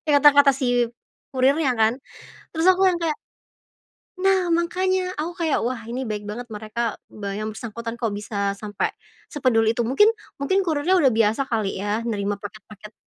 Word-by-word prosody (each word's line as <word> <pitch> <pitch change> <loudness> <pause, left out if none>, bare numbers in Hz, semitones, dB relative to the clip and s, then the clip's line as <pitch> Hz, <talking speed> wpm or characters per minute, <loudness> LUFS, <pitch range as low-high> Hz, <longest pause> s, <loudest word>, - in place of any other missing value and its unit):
Eh, 295 - +4
kata-kata 285 0 +7
si 245 -3 +1 0.4
kurirnya 270 +2 +2
kan, 220 +1 +4 0.6
terus 320 +2 +1
aku 380 +1 +3
yang 370 - +4
kayak 310 -2 0 1.0
nah, 380 -2 +2
makanya 365 +2 0
aku 330 +3 -2
kayak 315 - +2
wah 245 0 -2
ini 245 +3 -4
baik 210 -1 -4
banget 240 +4 -6
mereka 220 +1 -3
be 200 -2 -7
yang 215 0 -4
bersangkutan 230 +1 -6
kok 235 -2 -2
bisa 200 -1 -2
sampai 205 -1 -2 0.4
sepeduli 230 -6 +2
itu, 240 - 0
mungkin 415 - +5 0.3
mungkin 380 +8 +1
kurirnya 335 +4 +2
udah 265 -7 +4
biasa 225 +3 +2
kali 215 -5 -2
ya 205 +3 -1
nerima 205 -3 -2
paket-paket 210 0 -11
240 Hz, 160 wpm, -23 LUFS, 215-305 Hz, 1.0 s, kata-kata